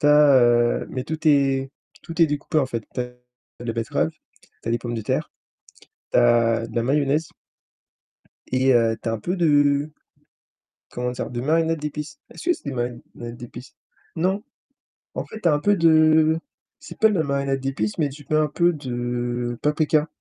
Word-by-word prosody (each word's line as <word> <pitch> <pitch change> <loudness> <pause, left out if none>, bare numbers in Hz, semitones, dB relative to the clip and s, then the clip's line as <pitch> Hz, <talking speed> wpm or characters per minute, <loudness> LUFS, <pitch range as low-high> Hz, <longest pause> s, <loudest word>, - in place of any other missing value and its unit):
tu - - +2
as 150 -2 +7
heu 120 0 +3
mais 130 -1 -4
tout 160 +2 -4
est 135 -2 +2 0.3
tout 165 0 -6
est 165 - +7
découpé 150 +1 -1
en 140 - +1
fait. 115 -4 -4
Tu - - -2
as 125 - 0 0.6
de - - -7
la 115 - -2
betterave, 115 -1 -1
tu - - -16
as - - +1
des 120 - +1
pommes 120 -1 -5
de 115 - -3
terre, - - -2 0.8
tu - - +4
as 115 -1 +3
de - - -12
la 115 - +2
mayonnaise. 145 +4 +1 1.2
Et, 130 +1 +3
heu, 115 -2 +3
tu 115 - -2
as - - -1
un 115 - -3
peu 180 - -2
de, 145 -3 +3 1.0
comment 125 0 -3
dire? 125 - -5
De 120 -1 -4
marinade 165 +3 +1
d'épices. 150 0 -6
Est-ce - - -10
que - - +7
c'est - - -16
des 140 -3 -4
marinades 120 -1 -6
d'épices? 120 +1 -11 0.4
Non. 190 +5 0 0.7
En - - -4
fait, 220 - -10
tu 175 - +3
as - - +4
un 145 - +1
peu 205 +6 +3
de 160 -2 +5 0.4
c'est - - -12
pas 220 - +6
de 210 - 0
la 160 - +2
marinade 140 -1 -1
d'épices, 130 -6 -2
mais 150 -3 +1
tu 145 +1 -12
mets 155 - +3
un 155 0 +3
peu 170 +4 +2
de 120 -3 -3
paprika. 150 +1 +2
140 Hz, 195 wpm, -23 LUFS, 120-155 Hz, 1.2 s, as